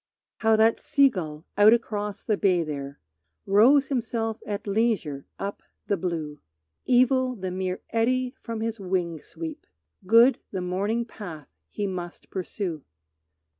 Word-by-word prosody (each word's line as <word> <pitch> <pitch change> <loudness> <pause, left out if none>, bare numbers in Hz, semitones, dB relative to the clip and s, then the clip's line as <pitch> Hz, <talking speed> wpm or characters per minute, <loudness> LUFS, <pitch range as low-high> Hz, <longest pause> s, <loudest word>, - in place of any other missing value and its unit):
How 220 -1 +3
that 220 +1 +4
sea 285 -2 +4
gull 160 -7 -6
out 210 +2 +8
across 210 -3 -2
the 215 - +1
bay 185 -4 +2
there 140 -2 -6 0.5
Rows 250 +8 +5
himself 225 -4 -2
at 205 -1 -3
leisure 200 -10 0
up 200 +1 -5 0.2
the 200 - +1
blue! 160 -5 -4 0.5
Evil 255 0 +3
the 190 -4 -4
mere 185 0 -3
eddy 250 +2 +1
from 230 -1 -5
his 225 0 -2
wing 180 -4 -2
sweep, 160 -1 -8 0.4
Good 230 +5 +6
the 190 - -4
morning 200 +6 -1
path 175 - -9 0.2
he 205 - -3
must 180 -3 -6
pursue. 180 -4 -4
205 Hz, 135 wpm, -26 LUFS, 180-230 Hz, 0.5 s, out